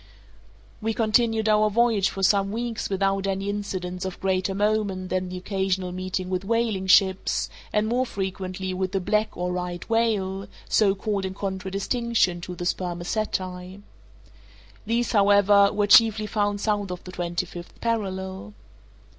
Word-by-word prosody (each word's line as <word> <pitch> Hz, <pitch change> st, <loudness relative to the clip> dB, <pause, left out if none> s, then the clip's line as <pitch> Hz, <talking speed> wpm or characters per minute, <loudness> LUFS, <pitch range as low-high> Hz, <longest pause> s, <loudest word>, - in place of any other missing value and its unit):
We 220 Hz, 0 st, -1 dB
continued 225 Hz, 0 st, +2 dB
our 215 Hz, 0 st, +4 dB
voyage 215 Hz, -3 st, +2 dB
for 195 Hz, -, -5 dB
some 195 Hz, 0 st, +3 dB
weeks 230 Hz, +1 st, -3 dB
without 195 Hz, 0 st, 0 dB
any 195 Hz, +1 st, -1 dB
incidents 185 Hz, -3 st, -4 dB
of 190 Hz, -1 st, -5 dB
greater 190 Hz, 0 st, 0 dB
moment 205 Hz, -3 st, 0 dB
than 185 Hz, 0 st, -1 dB
the 180 Hz, -, -5 dB
occasional 190 Hz, -1 st, -1 dB
meeting 185 Hz, 0 st, -3 dB
with 185 Hz, 0 st, -2 dB
whaling 220 Hz, -3 st, 0 dB
ships, 190 Hz, 0 st, +3 dB, 0.2 s
and 210 Hz, 0 st, +1 dB
more 250 Hz, +3 st, 0 dB
frequently 190 Hz, -2 st, -4 dB
with 185 Hz, +1 st, -2 dB
the 195 Hz, -, +1 dB
black 210 Hz, +3 st, 0 dB
or 180 Hz, +1 st, -2 dB
right 180 Hz, -1 st, -4 dB
whale, 200 Hz, -4 st, 0 dB, 0.2 s
so 200 Hz, -3 st, +3 dB
called 200 Hz, -1 st, -2 dB
in 190 Hz, 0 st, -4 dB
contradistinction 195 Hz, 0 st, -1 dB
to 180 Hz, +1 st, -6 dB
the 175 Hz, -, -5 dB
spermaceti. 180 Hz, +1 st, -3 dB, 1.0 s
These, 235 Hz, +1 st, 0 dB
however, 200 Hz, -1 st, +5 dB
were 205 Hz, -1 st, +1 dB
chiefly 215 Hz, 0 st, +6 dB
found 205 Hz, -1 st, -1 dB
south 205 Hz, -2 st, 0 dB
of 180 Hz, -1 st, -6 dB
the 180 Hz, -, -9 dB
twenty 175 Hz, 0 st, -2 dB
fifth 175 Hz, 0 st, -11 dB
parallel. 190 Hz, -, -3 dB
195 Hz, 145 wpm, -25 LUFS, 185-215 Hz, 1.0 s, chiefly